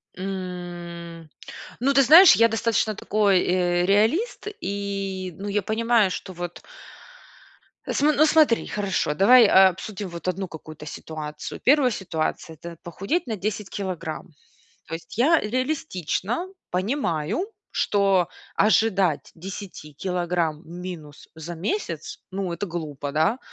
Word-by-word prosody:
М, 175 -3 -7 0.5
ну 275 +3 +2
ты 275 - +6
знаешь, 325 +8 +9
я 230 - +5
достаточно 225 -1 0
такой, 205 -3 +2
э, 175 -1 +1
реалист 225 - +1
и, 195 -2 -3
ну, 200 - -6
я 205 +1 0
понимаю, 220 0 +2
что 185 +1 -6
вот 175 0 -6 1.2
См 295 +1 +1
ну 310 - +6
смотри, 310 -6 +4
хорошо, 190 -7 -1
давай, 230 +8 +7
э, - - +3 0.2
обсудим 190 +1 -6
вот 170 +1 -8
одну 185 +1 -2
какую-то 155 -2 -10
ситуацию. 150 0 -7
1 270 -1 +4
ситуация- 165 -4 -3
это 170 +2 -10
похудеть 195 - -2
на 225 - -2
10 205 +1 -3
килограмм. 170 -5 -5 0.5
То 165 - -5
есть 165 +5 -9
я 315 +7 +5
реалистично 245 - -2 0.2
понимаю, 185 - -1 0.2
что 195 -4 +2 0.3
ожидать 195 -6 +2
10 180 -3 -8
килограмм 175 -2 -1
минус 170 -4 -9
за 165 +2 -7
месяц, 370 - -4
ну, 190 -2 -3
это 185 +4 -4
глупо, 150 -5 -5
да, 160 +11 +2
190 Hz, 125 wpm, -24 LUFS, 170-220 Hz, 1.2 s, знаешь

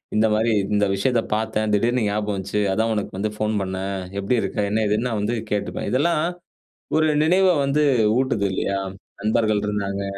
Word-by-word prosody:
இந்த 110 +1 +4
மாரி 110 +1 +2 0.2
இந்த 105 0 +3
விஷயத்த 115 +4 +1
பார்த்தேன். 110 -1 -1
திடீர்னு 120 +2 +1
ஞாபகம் 105 0 -1
வந்துச்சு. 95 +2 -2
அதான் 110 +2 +1
உனக்கு 100 -2 -4
வந்து 105 +2 -1
ஃபோன் 110 0 0
பண்ணேன். 95 +1 -3 0.2
எப்டி 120 +5 +1
இருக்க? - - -4
என்ன 110 0 +1
ஏதுன்னு 110 +4 0
நான் 110 - -2
வந்து 110 +4 -1 0.2
கேட்டுப்பேன். 105 -1 -2
இதெல்லாம் 155 +4 +2 0.8
ஒரு 155 0 +3 0.2
நினைவ 185 +3 +4 0.2
வந்து 140 +2 +1 0.4
ஊட்டுது 130 -6 0
இல்லயா? 100 +1 -1 0.4
நண்பர்கள் 110 0 +2
இருந்தாங்க. 100 -1 -2
110 Hz, 165 wpm, -22 LUFS, 100-120 Hz, 0.8 s, இந்த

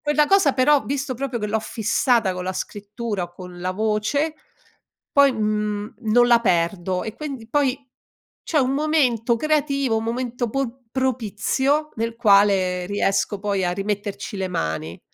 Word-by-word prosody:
quella 295 0 +2
cosa 380 -7 +4
però, 275 +2 +3
visto 270 -1 -2
proprio 250 -2 -3
che 210 - -2
l'ho 220 +1 +1
fissata 220 -1 +1
con 180 0 -5
la 185 - -2
scrittura, 205 0 -4
o 175 - -13
con 180 0 -10
la 185 +1 -2
voce 220 +9 0 0.8
poi, 280 -2 +5
mhmm, 210 -1 -2
non 240 +2 +4
la 235 - +6
perdo. 180 -1 0
E 220 0 -6
quindi 270 -7 -6
poi 275 -1 +1 0.7
c'è 310 - +1
un 260 0 +2
momento 275 -6 +2
creativo, 280 -4 +1
un 220 - -2
momento 240 0 -2
po 260 0 -3
propizio 260 +4 0
nel 230 +1 -2
quale 200 -5 +3
riesco 200 0 0
poi 200 -2 0
a 175 - 0
rimetterci 205 +2 -4
le 190 -1 -2
mani. 80 - -3
225 Hz, 155 wpm, -22 LUFS, 200-270 Hz, 0.8 s, la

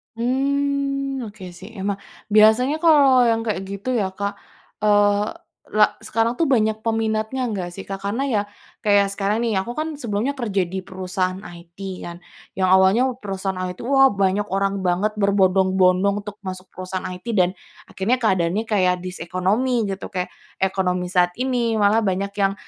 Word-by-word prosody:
Mmm, 275 +1 -1
oke, 205 -2 -12
sih, 185 +4 -12
emang 200 0 -2 0.4
biasanya 220 +7 +5
kalau 275 -6 +6
yang 225 0 +1
kayak 195 -4 -3
gitu 200 +5 -5
ya 190 -1 -2
Kak, 200 0 -4 0.4
eee, 205 0 +3 0.4
la 210 0 +2
sekarang 230 +2 -1
tuh 330 - +2
banyak 220 -5 +2
peminatnya 225 +2 -1
nggak 180 -4 -4
sih 195 - -8
Kak? 195 - -3
Karena 225 +7 -1
ya 210 -4 +2 0.4
kayak 200 -1 +4
sekarang, 205 +3 -1
nih, 220 -4 0
aku 235 +5 -4
kan 310 +1 -2
sebelumnya 230 +3 -1
kerja 205 -6 0
di 190 +2 -5
perusahaan 185 0 -3
IT 170 0 -12 0.3
kan 175 0 -8 0.3
yang 185 -1 +1
awalnya 190 +7 +5
perusahaan 195 -2 -4
IT, 180 0 -4
wah, 270 +1 +5
banyak 195 +1 +1
orang 195 0 0
banget 205 +4 0
berbondong-bondong 190 0 +3
untuk 205 -1 -8
masuk 185 0 -6
perusahaan 185 0 -5
IT 180 +5 -10
dan 180 -2 +4 0.4
akhirnya 205 +6 0
keadaannya 190 -1 +1
kayak 185 -5 +1
this 185 0 -6
ekonomi 205 +7 0
gitu 195 0 -5
kayak 180 -1 -2 0.3
ekonomi 180 -2 0
saat 175 -2 +3
ini, 245 -2 0
malah 205 +2 +4
banyak 195 +1 0
yang 195 -1 +2
200 Hz, 160 wpm, -22 LUFS, 185-230 Hz, 0.4 s, kalau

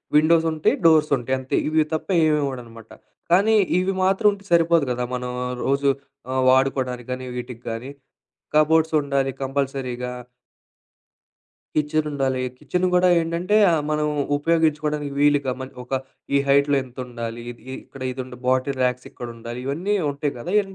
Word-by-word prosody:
Windows 165 +2 +5
ఉంటాయి, 155 0 +1
doors 155 -2 +5
ఉంటాయి 130 +2 -1
అంతే 130 - -3
ఇవి 155 0 +3
తప్ప 155 - -2 0.2
ఏం 155 - +3
ఇవ్వడు 130 -3 -3
అనమాట. 115 -1 -14 0.4
కానీ 205 +5 +5 0.2
ఇవి 190 +1 +1
మాత్రం 195 +3 +3
ఉంటే 200 0 -9
సరిపోదు 165 -3 +4
కదా 125 0 -1
మనం 125 0 -4 0.3
రోజు 140 +1 +2 0.4
ఆహ్, 130 0 +1
వాడుకోవడానికి 130 -2 +1
కానీ, 130 0 -4
వీటికి 125 -1 -7
కానీ 115 +4 -5 0.7
కబోర్డ్స్ 160 +1 +3
ఉండాలి 140 -1 0
కంపల్సరీగా. 130 -2 -2 1.6
కిచెన్ 155 0 +1
ఉండాలి, 135 -2 -1 0.2
కిచెన్ 180 0 -1
కూడా 180 0 +5
ఏంటంటే 170 +5 0
ఆహ్, 160 -2 +2
మనం 150 0 +1 0.3
ఉపయోగించుకోవడానికి 150 -2 0
వీలుగా 145 -2 +3
మన్ 130 - -7
ఒక 130 +1 -2 0.4
ఈ - - +5
హైట్‌‌లో 140 +1 +4
ఎంత 125 0 -17
ఉండాలి, 120 -1 -6
ఇ - - -5 0.3
ఇక్కడ 135 - -11
ఇది 130 - -6
ఉండ 125 -1 -11
బాటిల్ 130 +1 +1
రాక్స్ 125 0 -1
ఇక్కడ 120 - -8
ఉండాలి. 120 +2 -7
ఇవన్నీ 170 +9 -1 0.2
ఉంటాయి 140 0 -3
గదా 175 +10 -5
ఇయన్ 195 -2 -2
140 Hz, 155 wpm, -23 LUFS, 130-160 Hz, 1.6 s, Windows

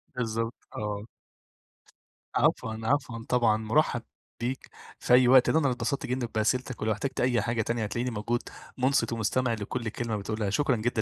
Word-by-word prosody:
بالضبط، 115 -1 -1 0.2
آه. 105 -1 -3 1.3
عفوًا، 110 -1 +2
عفوًا 120 -2 -1
طبعًا، 115 -4 +3
مُرحب 120 +3 +1 0.4
بيك 125 +3 -3 0.3
في - - +2
أي 125 0 +7
وقت، 130 0 +7
ده 160 - +4
أنا 155 - 0
اللي 125 - +1
اتبسطت 140 +2 -2
جدًا 125 -1 -1
بأسئلتك 125 +3 0
ولو 110 - +1
احتجت 130 +6 -2
أي 125 -2 +2
حاجة 115 +2 0
تانية 115 +1 -1
هتلاقيني 120 +4 -2
موجود، 115 +2 -1 0.4
مُنصِت 130 -1 +2
ومستمع 115 +2 +1
لكلّ 115 +2 -3
كلمة 115 0 -3
بتقولها، 105 0 -2
شكرًا 125 +6 +2
جدًا 110 0 0
120 Hz, 165 wpm, -28 LUFS, 110-125 Hz, 1.3 s, أي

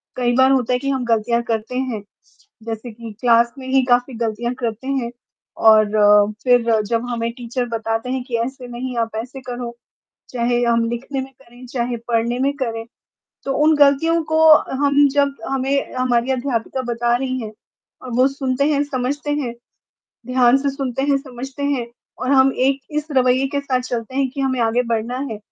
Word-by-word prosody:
कई 245 -1 +1
बार 260 +1 +5
होता 255 -2 +2
है, 250 - +1
कि 275 +2 -3
हम 265 -2 -1
गलतियाँ 235 +1 +1
करते 225 +1 -3
हैं। 245 -6 -3 0.6
जैसे 225 +1 -6
कि 230 0 -9
क्लास 235 -1 +3
में 260 - -8
ही 265 -1 +3
काफ़ी 245 0 +2
गलतियाँ 230 +1 -2
करते 230 +1 -3
हैं 265 -4 -1 0.5
और 210 -1 +5
फिर 235 -3 +3
जब 230 +2 -1
हमें 230 -1 -2
टीचर 245 +1 -4
बताते 225 +1 -2
हैं, 260 -1 -2
कि 245 -3 -2
ऐसे 260 0 -7
नहीं, 245 +1 -5
आप 225 -1 -2
ऐसे 255 +3 -10
करो, 245 -2 -6 0.5
चाहे 240 0 0
हम 235 -1 +2
लिखने 265 +3 -4
में 265 +1 -8
करें, 250 -1 -17
चाहे 240 -1 -2
पढ़ने 235 +1 0
में 275 +2 +1
करें। 225 -4 -3 0.6
तो 275 - -1
उन 315 0 +5
गलतियों 295 +4 +4
को 315 +1 0 0.4
हम 285 0 +5
जब 280 -1 +2
हमें 270 +1 -1
हमारी 255 -1 +1
अध्यापिका 260 -1 -2
बता 240 -1 0
रही 260 0 -2
हैं 215 -1 -7 0.5
और 255 - -8
वो 255 - +5
सुनते 270 -1 -1
हैं, 285 -1 +2
समझते 285 +2 -3
हैं, 270 -5 -2 0.7
ध्यान 255 0 +4
से 280 0 -1
सुनते 270 -2 -3
हैं, 280 0 +2
समझते 270 0 -8
हैं 275 -4 0 0.3
और 255 - -2
हम 265 -1 +5
एक 275 0 +1 0.2
इस 300 - -5
रवैये 255 0 +3
के 280 - +1
साथ 265 -3 -1
चलते 245 0 -5
हैं 275 -1 +1
कि 275 +1 -6
हमें 260 -2 0
आगे 230 +2 +2
बढ़ना 230 +3 -2
है, 215 - -5
250 Hz, 185 wpm, -20 LUFS, 235-270 Hz, 0.7 s, बार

